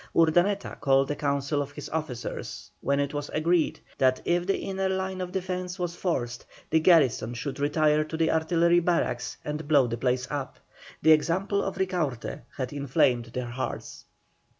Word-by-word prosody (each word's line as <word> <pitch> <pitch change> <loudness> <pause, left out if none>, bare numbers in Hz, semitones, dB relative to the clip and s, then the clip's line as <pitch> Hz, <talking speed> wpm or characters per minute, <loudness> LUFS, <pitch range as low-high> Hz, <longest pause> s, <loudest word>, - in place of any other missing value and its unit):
Urdaneta 175 +5 +2
called 135 0 +3
a - - -1
council 140 0 0
of 145 0 -6
his - - -7
officers, 150 -7 -5
when 140 0 +1
it 140 0 -1
was 145 0 -3
agreed 165 +1 +2 0.2
that 130 -1 +3
if 175 +1 +1
the 195 - +2
inner 190 0 -2
line 190 0 -2
of 180 -1 -4
defence 185 -1 -3
was 175 -1 -3
forced, 120 -11 -2 0.3
the 160 - +5
garrison 140 -9 +4
should 135 +3 -5
retire 150 +1 +3
to 160 +1 -5
the 160 0 +2
artillery 170 +2 +3
barracks 165 -9 0
and 150 0 -4
blow 145 -4 +5
the 115 0 -3
place 125 +1 0
up. 140 -2 -4 0.5
The 160 - +7
example 190 +6 +2
of 195 - -3
Ricaurte 160 - -2 0.2
had 130 0 -3
enflamed 130 -4 +2
their 120 0 -5
hearts. 130 +2 -5
155 Hz, 170 wpm, -27 LUFS, 135-175 Hz, 0.5 s, The